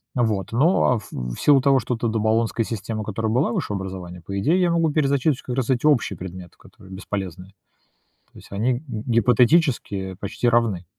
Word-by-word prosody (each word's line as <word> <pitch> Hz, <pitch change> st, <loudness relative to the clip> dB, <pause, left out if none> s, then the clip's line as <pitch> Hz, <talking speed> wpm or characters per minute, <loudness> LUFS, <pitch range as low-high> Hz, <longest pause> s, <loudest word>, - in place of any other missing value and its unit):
Вот. 110 Hz, -7 st, 0 dB
Но 125 Hz, -1 st, +3 dB
в -, -, -14 dB
в -, -, -5 dB
силу 140 Hz, -2 st, +5 dB
того, 135 Hz, 0 st, +4 dB
что 125 Hz, +1 st, -2 dB
то 115 Hz, +1 st, -2 dB
до 110 Hz, 0 st, -1 dB
болонская 110 Hz, +1 st, +1 dB
система, 110 Hz, 0 st, -4 dB
которая 110 Hz, +1 st, -2 dB
была 125 Hz, +3 st, +1 dB
высшее 105 Hz, -, -2 dB
образование, 95 Hz, -2 st, -7 dB
по 100 Hz, +3 st, -6 dB
идее, 160 Hz, -, +2 dB
я 180 Hz, -2 st, +2 dB
могу 165 Hz, -2 st, +2 dB
перезачесть 140 Hz, -1 st, +1 dB
как 125 Hz, -, -5 dB
раз 130 Hz, -2 st, -1 dB
эти 130 Hz, +1 st, +1 dB
общие 125 Hz, -, +2 dB
предметы, 90 Hz, 0 st, -9 dB
которые 95 Hz, -, -16 dB
бесполезные. 95 Hz, -1 st, -6 dB, 0.8 s
То -, -, -15 dB
есть -, -, -15 dB
они 115 Hz, +6 st, +1 dB
г 120 Hz, -, -5 dB
гипотетически 115 Hz, -, +1 dB
почти 100 Hz, +4 st, -2 dB
равны. 115 Hz, -7 st, +1 dB
115 Hz, 185 wpm, -22 LUFS, 100-130 Hz, 0.8 s, силу